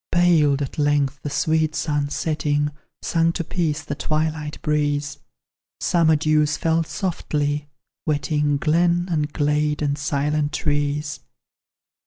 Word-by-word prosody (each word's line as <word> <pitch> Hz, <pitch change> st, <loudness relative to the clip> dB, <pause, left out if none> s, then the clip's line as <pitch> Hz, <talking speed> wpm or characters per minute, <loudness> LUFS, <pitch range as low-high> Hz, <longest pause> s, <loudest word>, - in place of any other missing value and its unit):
Paled, 155 Hz, -5 st, +4 dB
at 140 Hz, -, -6 dB
length, 145 Hz, -2 st, +1 dB
the 145 Hz, -, -4 dB
sweet 155 Hz, +1 st, +1 dB
sun 145 Hz, -2 st, -1 dB
setting; 150 Hz, -1 st, 0 dB, 0.3 s
Sunk 165 Hz, 0 st, +1 dB
to 170 Hz, -, -1 dB
peace 160 Hz, -3 st, -1 dB
the -, -, -4 dB
twilight 155 Hz, +1 st, -2 dB
breeze: 145 Hz, -1 st, 0 dB, 0.6 s
Summer 165 Hz, -2 st, +3 dB
dews 150 Hz, 0 st, +2 dB
fell 165 Hz, 0 st, +1 dB
softly, 150 Hz, -4 st, -2 dB, 0.4 s
wetting 150 Hz, -1 st, +1 dB
Glen, 170 Hz, +4 st, +2 dB
and 150 Hz, -2 st, 0 dB
glade, 150 Hz, 0 st, 0 dB
and 145 Hz, 0 st, 0 dB
silent 145 Hz, +1 st, 0 dB
trees. 145 Hz, -1 st, -1 dB
150 Hz, 120 wpm, -22 LUFS, 145-160 Hz, 0.6 s, Paled